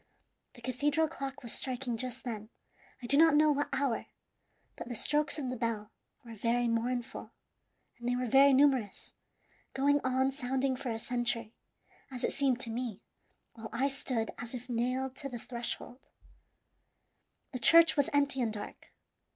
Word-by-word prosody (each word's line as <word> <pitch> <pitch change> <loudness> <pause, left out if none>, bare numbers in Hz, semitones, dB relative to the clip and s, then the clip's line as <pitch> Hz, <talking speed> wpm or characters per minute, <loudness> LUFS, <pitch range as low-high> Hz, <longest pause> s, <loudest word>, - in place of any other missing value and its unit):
The 240 - -14
cathedral 290 +5 +1
clock 275 -3 -6
was 235 - -4
striking 255 -2 -2
just 255 +2 -5
then, 215 -3 -5 0.5
I - - -4
do 280 +4 +3
not 320 -1 +6
know 305 0 +5
what 290 0 0
hour; 265 -4 -1 0.7
but - - -7
the 240 - -4
strokes 295 +6 0
of 265 -4 -3
the - - -3
bell 225 -3 -3 0.3
were 230 - -9
very 235 +2 +1
mournful, 240 +2 -2 0.7
and 240 0 -3
they 245 - +1
were 250 0 -1
very 275 +3 +6
numerous 265 -6 +2 0.6
going 285 +2 +3
on 260 +1 +2
sounding 265 -1 -1
for 255 0 -5
a 225 - -2
century, 235 -1 -1 0.6
as 250 -2 -6
it - - 0
seemed 265 -3 +1
to 230 - -1
me, 235 -3 -4 0.5
while 225 -1 -8
I 260 +5 +1
stood 255 -4 -2
as 240 +1 -6
if 250 +1 -8
nailed 255 +2 -1
to 275 - -5
the 245 - -5
threshold. 240 +2 -5 1.4
"The 255 - -4
church 330 +6 +7
was 285 -2 +2
empty 280 -2 +2
and 230 -2 0
dark. 210 -1 -8
255 Hz, 165 wpm, -31 LUFS, 235-275 Hz, 1.4 s, church